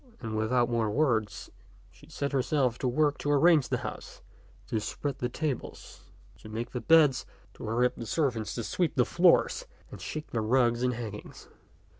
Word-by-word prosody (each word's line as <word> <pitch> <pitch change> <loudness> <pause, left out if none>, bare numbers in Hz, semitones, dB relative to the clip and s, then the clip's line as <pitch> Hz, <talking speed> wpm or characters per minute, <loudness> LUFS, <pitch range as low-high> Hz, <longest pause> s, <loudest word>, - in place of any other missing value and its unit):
And 110 -3 -5
without 120 +3 +1
more 115 -3 0
words 115 -5 0 0.4
she - - -19
set 140 0 -3
herself 130 -2 0
to 130 - -1
work 145 +3 +1
to 145 - -3
arrange 150 0 +4
the - - +1
house, - - -8 0.4
to 110 - -2
spread 140 +5 -4
the 120 - -1
tables, 145 -1 -5 0.3
to 110 - -12
make 115 +2 -5
the 125 - -4
beds, 155 -5 +5 0.3
to - - -9
hurry 115 +3 +1
on 125 - +1
the 115 - -6
servants 120 - -1
to 115 - -3
sweep 170 +7 -1
the 125 - +3
floors 180 - +3 0.2
and - - -10
shake 155 0 -6
the 115 - -1
rugs 120 +1 +2
and 125 -1 +1
hangings. 110 -3 -8
125 Hz, 180 wpm, -29 LUFS, 115-145 Hz, 0.4 s, beds